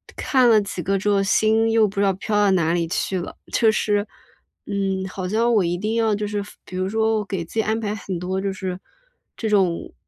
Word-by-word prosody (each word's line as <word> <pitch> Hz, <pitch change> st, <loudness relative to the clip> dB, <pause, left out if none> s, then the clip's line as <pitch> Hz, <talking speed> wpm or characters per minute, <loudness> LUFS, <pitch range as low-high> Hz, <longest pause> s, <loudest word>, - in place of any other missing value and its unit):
看 255 Hz, -3 st, +3 dB
了 220 Hz, -2 st, +6 dB
几 195 Hz, -3 st, -5 dB
个 195 Hz, +3 st, +1 dB
之 205 Hz, +2 st, -1 dB
后 200 Hz, -1 st, +3 dB
心 220 Hz, +2 st, +3 dB
又 225 Hz, -2 st, +4 dB
不 200 Hz, 0 st, -5 dB
知 -, -, +3 dB
道 195 Hz, -, +3 dB
飘 200 Hz, +3 st, -3 dB
到 205 Hz, -1 st, +4 dB
哪 170 Hz, -3 st, +2 dB
里 170 Hz, -1 st, 0 dB
去 185 Hz, +2 st, -1 dB
了。 175 Hz, -, -7 dB, 0.2 s
就 225 Hz, -, +4 dB
是， 210 Hz, -1 st, 0 dB, 0.6 s
嗯， 195 Hz, -2 st, -1 dB
好 185 Hz, -1 st, -5 dB
像 230 Hz, +4 st, +2 dB
我 210 Hz, -, +4 dB
一 175 Hz, +1 st, -1 dB
定 215 Hz, +4 st, -2 dB
要 220 Hz, -2 st, +2 dB
就 210 Hz, -, -3 dB
是 205 Hz, 0 st, -2 dB, 0.2 s
比 185 Hz, -, -7 dB
如 185 Hz, 0 st, -1 dB
说 220 Hz, +1 st, +1 dB
我 210 Hz, -, -2 dB
给 190 Hz, -4 st, -3 dB
自 170 Hz, -, -15 dB
己 220 Hz, -, +3 dB
安 220 Hz, +1 st, 0 dB
排 210 Hz, -2 st, -2 dB
很 190 Hz, -3 st, -5 dB
多 185 Hz, +2 st, -2 dB
就 195 Hz, 0 st, -2 dB
是 185 Hz, -1 st, -5 dB, 0.6 s
这 220 Hz, -, -2 dB
种， 190 Hz, -5 st, +1 dB
200 Hz, 255 characters per minute, -22 LUFS, 190-220 Hz, 0.6 s, 了